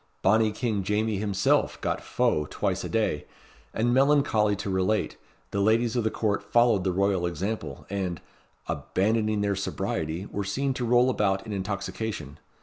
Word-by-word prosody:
Bonnie 110 +2 +4
King 110 -2 -1
Jamie 105 +1 0
himself 100 -2 +1
got - - -2
fou 75 -1 0
twice - - -1
a - - -4
day; 110 -10 0 0.5
and, 120 +2 +1
melancholy 135 -6 +3
to 100 +1 -6
relate, 95 +3 0 0.4
the 100 - 0
ladies 115 +3 +2
of 120 - +1
the 110 - +2
Court 105 -2 -1
followed 110 -1 +3
the 95 - +1
royal 95 -1 +1
example, 85 -5 -4
and, 95 -4 -3 0.5
"abandoning 110 +1 0
their 100 -1 +1
sobriety, 85 -2 -3
were 100 - -2
seen 135 +8 -1
to 125 -1 -3
roll 120 +2 +4
about 95 -4 0
in 110 - -5
intoxication." 100 -5 -4
105 Hz, 155 wpm, -27 LUFS, 95-110 Hz, 0.5 s, Bonnie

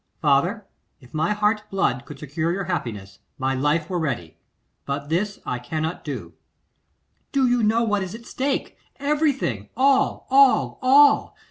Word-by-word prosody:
'Father, 170 +8 +2 0.3
if 125 -3 -19
my 160 +4 0
heart's 210 +1 +1
blood 160 -10 0
could 150 - -9
secure 155 +3 -2
your 195 +3 -2
happiness, 105 - -5 0.2
my 130 0 0
life 145 +4 0
were 180 -1 -2
ready; 120 - -3 0.5
but 140 +1 -3
this 195 +5 -1
I 125 - -2
cannot 155 +6 -4
do.' - - -6 1.0
'Do 270 -2 +2
you 245 -1 +2
know 225 +2 +2
what 205 -3 0
is 190 +2 -5
at 230 0 -12
stake? 270 +3 -2 0.2
Everything. 280 - 0
All, 270 +1 +2
all, 275 -1 +4
all! 280 +2 +5
180 Hz, 150 wpm, -23 LUFS, 140-235 Hz, 1.0 s, all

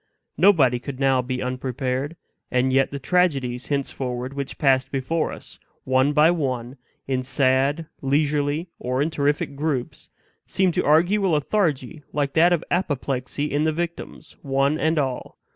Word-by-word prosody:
Nobody 150 -9 +4
could 135 +1 -7
now 135 -2 +3
be 125 0 -3
unprepared; 130 +3 -3 0.3
and 130 +1 +1
yet 135 0 +3
the 140 - -5
tragedies, 135 -6 0
henceforward, 130 -2 -3
which 140 -1 -5
passed 130 -3 +2
before 140 +4 -1
us, - - -11 0.2
one 130 +2 +2
by 150 +3 +5
one, 130 -6 -3 0.3
in 130 -1 0
sad, 135 +4 +1 0.2
leisurely, 145 +3 0
or 125 +2 -1
in 160 - -2
terrific 145 -1 -1
groups, 140 -4 -3 0.4
seemed 190 -2 +1
to - - 0
argue 175 +7 +3
a 190 - +2
lethargy 155 -3 0
like 140 -1 -1
that 170 +2 +5
of 170 -2 +1
apoplexy 145 -4 -2
in 145 +1 +1
the 160 - +2
victims, 170 +2 -6
one 140 +2 +1
and 160 +1 +1
all. 130 -4 -2
140 Hz, 150 wpm, -23 LUFS, 130-155 Hz, 0.4 s, by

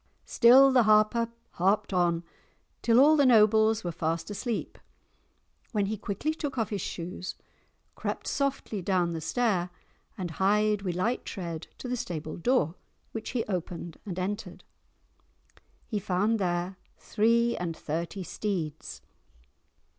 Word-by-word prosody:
Still 260 +3 +7
the 255 -1 +5
Harper 215 +2 +4 0.2
harped 195 +3 +1
on 175 -2 +2 0.6
till 230 0 +4
all 300 +3 +7
the 290 - +4
nobles 220 -2 +5
were 175 - -2
fast 165 +3 -2
asleep, 230 +2 -4 0.9
when 205 -2 +1
he 210 +2 -2
quickly 210 +9 -2
took 290 -4 -5
off 225 -2 -1
his 200 -3 -2
shoes, 180 +2 -5 0.6
crept - - -4
softly 275 -7 -2
down 175 -2 +1
the 165 - -4
stair, 185 0 0 0.5
and 180 -4 -4
hied 210 +1 +3
with 180 -3 -3
light 225 +8 0
tread 170 -5 -6
to - - -7
the 250 - -1
stable 160 -9 -5
door, 180 - +1 0.4
which 225 0 -5
he 240 -3 -1
opened 175 -3 -5
and 185 -4 -6
entered. 200 +4 -4 1.2
He 215 - -2
found 205 +3 +1
there 180 0 -1 0.2
three 235 +2 +2
and 170 -2 -4
thirty 170 +5 -4
steeds. 170 -6 -4
205 Hz, 135 wpm, -28 LUFS, 175-230 Hz, 1.2 s, Still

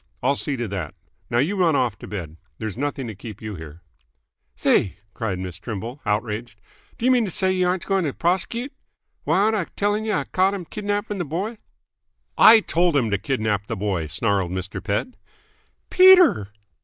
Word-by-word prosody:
I'll 140 +3 +3
see 140 0 -2
to 120 -1 -3
that. 90 -6 -5 0.3
Now 120 - 0
you 155 +11 +1
run 175 -5 +3
off 120 -6 +1
to - - -9
bed. 85 -6 -6 0.2
There's 110 -3 -5
nothing 140 +1 -3
to 110 - -5
keep 105 +1 -10
you 110 -1 -6
here." 80 -1 -10 0.7
"Say!" 95 - +2 0.2
cried 110 -6 -3
Miss 90 -2 -6
Trimble, 115 +7 -6
outraged. 110 +2 -2 0.4
"D'ya 250 +2 +2
mean 250 -2 +4
t' - - -3
say 185 +2 +1
y' 185 -1 +1
aren't 180 0 0
going 195 -3 +1
t' 145 - 0
pros'cute? 190 - -1 0.5
Why, - - +2
aren't 215 +3 +3
I 195 -5 -1
tell'ng 205 +4 -1
y' 220 - -1
I - - -4
caught 190 +2 +1
h'm 185 -3 -6
kidnapping 205 +1 -3
th' 170 -5 -3
boy?" 205 +8 -3 0.8
"I 225 0 +8
told 175 -4 +1
him 120 -6 +2
to 100 - +1
kidnap 110 -3 -1
the - - -4
boy!" 95 -5 -2
snarled 100 +2 0
Mr. 95 +1 -5
Pett. 100 - -1 0.8
"Peter!" 365 - +7
135 Hz, 185 wpm, -23 LUFS, -, 0.8 s, I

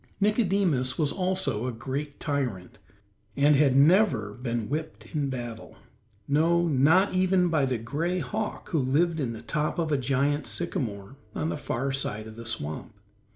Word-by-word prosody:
Nicodemus 195 - +2
was 150 -3 +1
also 185 - -1
a - - -1
great 135 +5 -5
tyrant, 125 - -3 0.6
and 145 +1 +5
had 135 -2 +4
never 140 - +4
been 120 -2 -3
whipped 155 +2 -5
in 145 -3 0
battle 120 -3 -6 0.5
no, 170 +4 +3
not 160 +8 +4
even 185 -1 +3
by 155 -4 +2
the 130 -2 0
gray 150 +11 -2
hawk 210 +4 -4
who 165 -6 +1
lived 160 +6 +1
in 125 -5 -1
the 110 - -9
top 150 -1 -1
of 165 -2 -1
a 145 - +3
giant 140 +2 0
sycamore, 105 +1 -3 0.2
on 80 0 -1
the 85 - -2
far 135 +3 -2
side 110 -5 -2
of 110 0 -10
the 115 0 -8
swamp. 105 -1 -4
140 Hz, 160 wpm, -27 LUFS, 120-165 Hz, 0.6 s, and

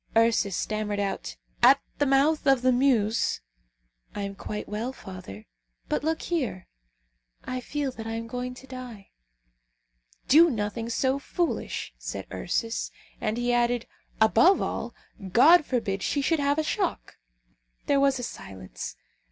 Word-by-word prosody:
Ursus 225 -4 +3
stammered 210 +1 -2
out, 200 -1 -3 0.3
"At 260 +3 +7 0.2
the 290 - +3
mouth 280 +3 +3
of 270 -2 +4
the 255 - +5
Meuse 245 -4 +2 0.4
" - - -37
"I 205 - -3
am 200 0 -4
quite 210 +2 -6
well, 220 +5 -3
father; 185 - -10 0.4
but - - 0
look 320 +1 -1
here! 255 - -2 0.8
I 255 0 -4
feel 285 +1 -2
that 225 -2 -8
I 225 - -3
am 230 0 -4
going 250 +2 -5
to 260 - -12
die!" 250 -6 -9 1.2
"Do 330 +4 +7
nothing 225 -1 -3
so 260 +3 +1
foolish," 345 +4 -2
said - - -5
Ursus. 230 -1 -2 0.3
And 215 0 -1
he 245 0 +1
added, 240 0 +1 0.3
"Above 335 - +5
all, - - -3 0.4
God 310 - +7
forbid 200 -6 -1
she 285 +7 0
should 325 +2 +2
have 285 +1 +2
a 315 - +2
shock!" 370 +3 -2 0.7
There 280 - +3
was 275 -1 +3
a 245 - -5
silence. 95 - -7
245 Hz, 150 wpm, -27 LUFS, 210-275 Hz, 1.2 s, At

